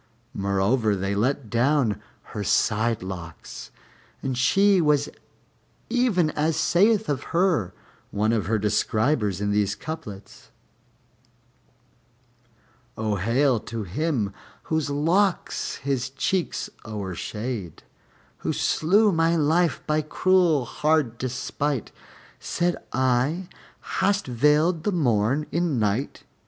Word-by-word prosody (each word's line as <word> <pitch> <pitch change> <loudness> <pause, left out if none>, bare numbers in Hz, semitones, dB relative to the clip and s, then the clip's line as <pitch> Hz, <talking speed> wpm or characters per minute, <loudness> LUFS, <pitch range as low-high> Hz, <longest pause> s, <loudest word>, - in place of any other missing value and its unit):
Moreover, 100 +2 +1
they 95 +1 -2
let 125 +5 0
down 120 -1 +1 0.3
her 105 - -3
side 110 +2 +1
locks, 85 -4 -8 0.5
and 130 -1 -1
she 195 +9 +4
was 150 -2 +2 0.8
even 220 -10 +2
as 155 +1 0
saith 210 +4 +3
of 145 -2 -2
her 160 - +1 0.3
one 110 +2 0
of 110 -4 0
her 110 +2 +2
describers 105 0 +1
in 105 0 -1
these 105 0 +1
couplets: 105 -8 -8 2.5
O 110 -2 -1
hail 120 +5 +2
to 115 0 -5
him 110 - -1 0.3
whose 160 -2 -1
locks 170 +7 0
his 135 -2 -2
cheeks 170 +7 -1 0.2
o'ershade, 105 0 -5 0.5
Who - - -2
slew 205 +7 +3
my 165 -1 +2
life 165 +2 +2
by 155 0 +1
cruel 165 -2 +2
hard 150 -5 0
despight: 130 +1 -2 0.5
Said 175 0 -1 0.2
I, 130 +8 +1 0.5
"Hast 200 +1 +2
veiled 150 +7 +2
the 210 - +1
Morn 130 - +1
in 170 -5 0
Night?" 110 +4 -1
135 Hz, 105 wpm, -25 LUFS, 110-160 Hz, 2.5 s, she